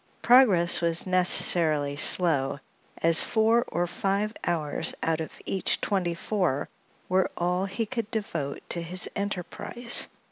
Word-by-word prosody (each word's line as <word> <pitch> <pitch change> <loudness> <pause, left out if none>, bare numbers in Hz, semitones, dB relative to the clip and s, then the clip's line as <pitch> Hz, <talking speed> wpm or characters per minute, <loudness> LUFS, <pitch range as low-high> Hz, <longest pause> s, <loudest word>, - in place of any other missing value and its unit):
Progress 210 -11 +5
was 170 0 0
necessarily 165 -5 +2
slow, 145 -3 +2 0.4
as 165 0 +5
four 225 +1 +2
or 175 +1 -1
five 200 +4 -2
hours 160 -2 +1
out 160 0 0
of 160 - -8
each 190 - -1
twenty 180 -4 -1
four 180 -7 -1 0.4
were 185 +1 +1
all 180 +2 0
he 195 +4 -3
could 230 -1 -4
devote 165 -11 -4
to 170 - -2
his 180 +2 -2
enterprise. 205 +5 -2
180 Hz, 130 wpm, -26 LUFS, 165-205 Hz, 0.4 s, Progress